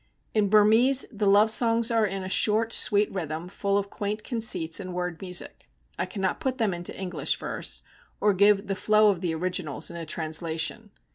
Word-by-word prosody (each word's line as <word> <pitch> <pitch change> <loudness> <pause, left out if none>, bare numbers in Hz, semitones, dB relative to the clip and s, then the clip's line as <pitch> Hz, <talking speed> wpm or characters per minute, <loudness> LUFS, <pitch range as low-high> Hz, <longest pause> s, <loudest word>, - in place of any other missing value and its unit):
In 210 -2 +1
Burmese 220 +6 +5
the 210 -3 -2
love 205 +2 +5
songs 230 +1 +3
are 225 -2 +2
in 195 -1 -5
a - - -5
short, 220 +4 +1
sweet 205 0 +3
rhythm, 165 -2 -5
full 200 +1 -1
of 200 0 -3
quaint 210 +1 -4
conceits 220 -9 +1
and 185 -2 -7
word 180 -2 -4
music. 180 -2 -4 0.3
I - - -1
cannot 190 -3 -3
put 265 -4 -2
them 220 -6 0
into 175 +1 -4
English 185 -2 -2
verse, - - -5 0.4
or 210 -1 +2
give 200 +1 +3
the 195 - -2
flow 215 +2 +3
of 180 -3 -5
the 170 -3 -2
originals 180 -3 -2
in 170 - -8
a 165 -2 -7
translation. 160 +6 -2
200 Hz, 190 wpm, -26 LUFS, 180-215 Hz, 0.4 s, Burmese